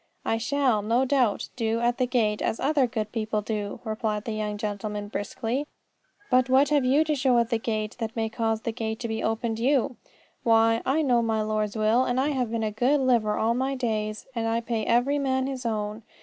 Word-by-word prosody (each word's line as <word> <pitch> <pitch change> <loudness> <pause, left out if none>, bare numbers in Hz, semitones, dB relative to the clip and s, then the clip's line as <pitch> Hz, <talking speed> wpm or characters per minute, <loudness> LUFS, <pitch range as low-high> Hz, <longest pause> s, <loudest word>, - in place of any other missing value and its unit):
"I 225 - 0
shall, 250 -2 +1
no 230 +5 +2
doubt, 250 -6 +1
do 230 -1 0
at 240 +1 0
the 255 - +2
gate 220 -4 +1
as - - -1
other 280 -2 +2
good 220 -3 -3
people 215 -2 -2
do," 210 -1 -4
replied 215 -2 -2
the 225 - -3
young 210 -1 -3
gentleman 205 0 -4
briskly. 230 +7 -3 0.6
"But 255 0 +4
what 265 +2 +4
have 290 -2 +3
you 270 +5 +4
to 310 -1 0
show 260 -3 +2
at 235 +1 +1
the 230 - +1
gate 215 -2 -3
that 225 -1 -4
may 225 -1 0
cause 225 -1 -1
that - - -35
the 230 - -1
gate 220 0 -4
be 225 0 -3
opened 225 0 -1
to 230 - -4
you?" 270 -1 +2 0.4
"Why, 225 -1 +4
I 300 +4 +2
know 245 -4 +3
my 220 -1 0
Lord's 215 0 -1
will, 220 +4 +3
and 245 0 0
I 275 +3 +2
have 255 -5 -1
been 230 0 -2
a 215 - -1
good 250 +7 +2
liver 235 -5 +2
all 225 +1 +2
my 265 +3 -1
days, 215 -4 -2
and 230 -2 -1
I 225 +1 +1
pay 230 -2 -3
every 250 +5 +2
man 265 -1 0
his 260 -3 -3
own. 215 0 -3
230 Hz, 220 wpm, -26 LUFS, 215-255 Hz, 0.6 s, But